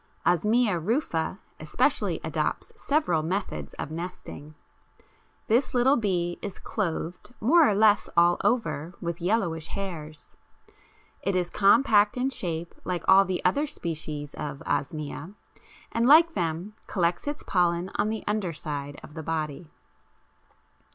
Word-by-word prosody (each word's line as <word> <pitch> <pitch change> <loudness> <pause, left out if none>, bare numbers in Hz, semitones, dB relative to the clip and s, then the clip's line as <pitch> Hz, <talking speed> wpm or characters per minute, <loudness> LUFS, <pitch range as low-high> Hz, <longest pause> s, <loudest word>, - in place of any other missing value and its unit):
Osmia 210 +2 +3
rufa 190 - -1 0.2
especially - - +1
adopts - - -2
several 290 - +1
methods 155 - -3
of - - -5
nesting. 160 -3 -7 0.9
This 245 +4 +1
little 255 +3 +5
bee 180 -7 -1
is 200 -2 -6
clothed 175 +3 -4
more 305 +8 +5
or 205 - +1
less 210 0 +4
all 175 +1 +5
over 180 - 0
with 170 -1 -4
yellowish 175 -5 0
hairs; 160 -6 -7 0.9
it 195 -1 -1
is 180 -1 0
compact 210 +1 +4
in 260 +2 0
shape 170 -7 -4
like 180 -1 -3
all 195 +1 +7
the 185 -1 -3
other 285 +12 +2
species 155 - -5
of 145 -2 -6
Osmia, 150 +5 -3 0.6
and 230 +1 +1
like 325 +4 +7
them 170 - -2
collects 175 +4 0
its 290 0 -4
pollen 175 0 +1
on 215 - 0
the 220 0 -3
underside 150 -8 -3
of - - -12
the 160 - -6
body. 155 0 -4
180 Hz, 130 wpm, -27 LUFS, 160-215 Hz, 0.9 s, all